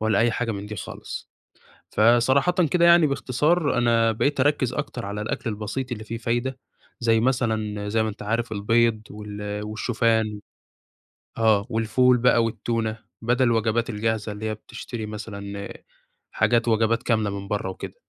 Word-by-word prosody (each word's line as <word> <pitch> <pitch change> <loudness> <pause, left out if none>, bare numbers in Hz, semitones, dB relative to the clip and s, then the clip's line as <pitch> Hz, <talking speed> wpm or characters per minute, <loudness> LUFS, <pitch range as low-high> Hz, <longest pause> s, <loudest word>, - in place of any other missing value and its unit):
ولا 110 -2 +2
أي 120 +1 +4
حاجة 115 0 -2
من 100 0 -6
دي 105 0 -6
خالص. 90 - -7 0.6
فصراحةً 120 +8 +4 0.2
كده 175 -1 +4
يعني 170 -2 +7
باختصار، 145 +3 +1
أنا 115 -2 +3
بقيت 140 +6 0
أركّز 130 -3 +2
أكتر 140 -6 -4
على 100 +1 -4
الأكل 110 +2 -3
البسيط 110 +5 -4
اللي 110 -3 -4
فيه 115 +2 -5
فايدة، 120 +3 -2 0.4
زي 115 -1 +3
مثلًا 110 -4 0
زي 110 +1 +2
ما 110 - -1
أنتَ 105 0 -8
عارف 115 +2 -1
البيض، 110 +2 +2
وال 105 0 -6
والشوفان، 110 -1 0 1.0
آه، 110 -3 +3
والفول 125 +3 +3
بقى، 120 -1 +4
والتونة، 115 -1 -2 0.2
بدل 120 +3 +2
الوجبات 115 0 +1
الجاهزة 110 -1 -1
اللي 105 +1 -6
هي 110 - -2
بتشتري 110 +1 -7
مثلًا 100 -2 -7 0.6
حاجات 115 +2 +2
وجبات 115 0 +2
كاملة 110 -3 +1
من 100 - -8
برّا 105 -2 -2
وكده. 95 - -7
115 Hz, 155 wpm, -24 LUFS, 105-120 Hz, 1.0 s, يعني